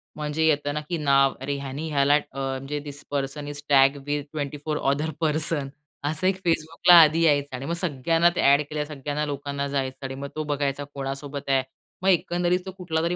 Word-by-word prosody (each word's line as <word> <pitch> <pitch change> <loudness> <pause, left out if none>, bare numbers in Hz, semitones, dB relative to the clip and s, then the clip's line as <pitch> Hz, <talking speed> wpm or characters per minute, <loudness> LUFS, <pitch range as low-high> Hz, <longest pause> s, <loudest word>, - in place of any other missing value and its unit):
म्हणजे 150 +1 -1
येतं 145 -2 +1
ना, 150 - -2
की 175 - -1
नाव, 140 -3 +3
अरे! 140 +1 -2
ह्याने 140 +3 -5
ह्याला 140 -1 +3
अ, - - +4 0.2
म्हणजे, 135 +2 -3
this 145 0 -7
person 140 +1 -3
is 145 0 -6
tag 135 0 +5
with 145 0 -1
24 150 0 -3
other 140 +3 0
person 155 -2 +1 0.4
असं 160 +5 0
एक 190 - +2
Facebookला 165 +2 +3
आधी 160 +1 +4
यायचं 145 -4 +2
आणि 130 +2 -6
मग 170 - -2
सगळ्यांना 165 0 +2
ते - - +1
एड 140 - +4
केल्या 150 -1 -2
सगळ्यांना 150 0 -3
लोकांना 140 -1 -3
जायचं 135 -1 -3
आणि 135 0 -5
मग 140 +1 -6
तो 155 - -2
बघायचा 145 -1 -1
कोणासोबत 140 +1 -5
आहे. 135 -1 +3 0.4
मग 190 - +2
एकंदरीत 175 0 +2
तो 190 - -5
कुठलातरी 170 -1 -1
145 Hz, 190 wpm, -25 LUFS, 140-155 Hz, 0.4 s, tag